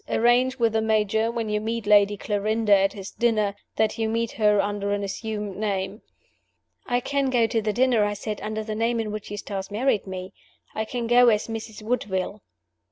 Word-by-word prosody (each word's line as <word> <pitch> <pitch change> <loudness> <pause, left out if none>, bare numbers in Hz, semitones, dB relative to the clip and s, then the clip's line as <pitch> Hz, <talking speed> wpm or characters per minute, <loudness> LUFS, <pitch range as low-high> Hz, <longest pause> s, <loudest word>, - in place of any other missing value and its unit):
Arrange 245 +3 +3
with 230 -3 +2
the 220 - +2
Major, 220 0 +1
when 230 -1 -3
you 210 0 -1
meet 225 +1 -3
Lady 205 0 +5
Clarinda 210 +1 +2
at 195 0 +2
his 195 -2 -8
dinner, 215 -4 +1 0.2
that 220 0 0
you 220 -1 0
meet 230 0 -1
her 210 -2 +3
under 205 0 -1
an 205 0 -1
assumed 210 0 -4
name." 200 0 -2 0.9
"I 245 -1 +1
can 280 +1 0
go 240 -3 +3
to 225 0 0
the 215 0 0
dinner," 245 0 +3
I 205 0 0
said, 210 +1 -5
"under 215 0 -3
the 215 0 -4
name 230 +2 0
in 220 -2 -2
which 215 -1 -6
Eustace 200 -1 -5
married 215 -1 0
me. 185 0 -6 0.4
I 220 - -2
can 240 +1 -3
go 245 +1 +5
as 210 -1 +2
'Mrs. 225 -1 -7
Woodville. 210 -3 -2
215 Hz, 195 wpm, -25 LUFS, 205-230 Hz, 0.9 s, Lady